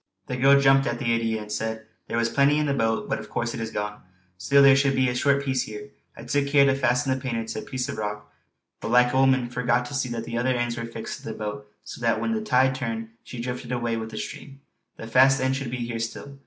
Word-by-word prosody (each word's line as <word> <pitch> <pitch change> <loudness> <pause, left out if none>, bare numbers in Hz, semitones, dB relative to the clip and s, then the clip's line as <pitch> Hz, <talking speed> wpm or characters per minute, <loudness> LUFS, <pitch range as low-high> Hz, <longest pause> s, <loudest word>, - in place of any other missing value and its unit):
The 125 - -4
girl 135 +2 +5
jumped 135 0 +4
at 120 - -1
the 120 -1 0
idea 115 -2 -1
and 105 - -11
said: 110 +1 -3 0.2
"There - - -2
was 115 0 +2
plenty 140 +4 +3
in 150 - +1
the 140 - 0
boat, 115 -4 0
but - - -1
of - - -10
course 120 0 -2
it - - -5
is 115 -1 -3
gone. 105 -1 -4 0.3
Still 140 +11 +4
there 135 -1 +8
should 140 0 +2
be 130 0 +3
a - - -1
short 140 +2 +2
piece 130 -2 +1
here. 110 +6 -9 0.3
I - - -9
took 140 +3 0
care 140 -1 +5
to 135 - +4
fasten 130 0 +1
the 130 - -3
painter 115 -4 -2
to 115 -1 -5
a - - -6
piece 130 -1 -4
of - - -5
rock; 105 0 -5 0.5
but - - -5
like 125 +1 +4
a - - +2
woman 130 -2 +3
forgot 125 0 +1
to 145 - -8
see 135 -2 -1
that 115 -1 -4
the 115 0 -3
other 130 +1 +1
end 120 -1 -1
was 115 -1 -5
fixed 115 -1 -6
to - - -16
the 110 - -4
boat, 105 -1 -6
so - - -9
that 115 -1 +1
when 225 - -1
the 220 - -1
tide 130 -9 +3
turned 115 -4 -4
she 125 - -9
drifted 125 0 -5
away 120 -2 -1
with 110 0 -4
the 110 - -8
stream. 135 +4 -8 0.4
The - - -8
fast 130 +4 +5
end 130 +1 +1
should 135 -2 -4
be 125 -1 -3
here 115 -1 -4
still." 135 +4 -6
125 Hz, 275 wpm, -25 LUFS, 115-135 Hz, 0.5 s, there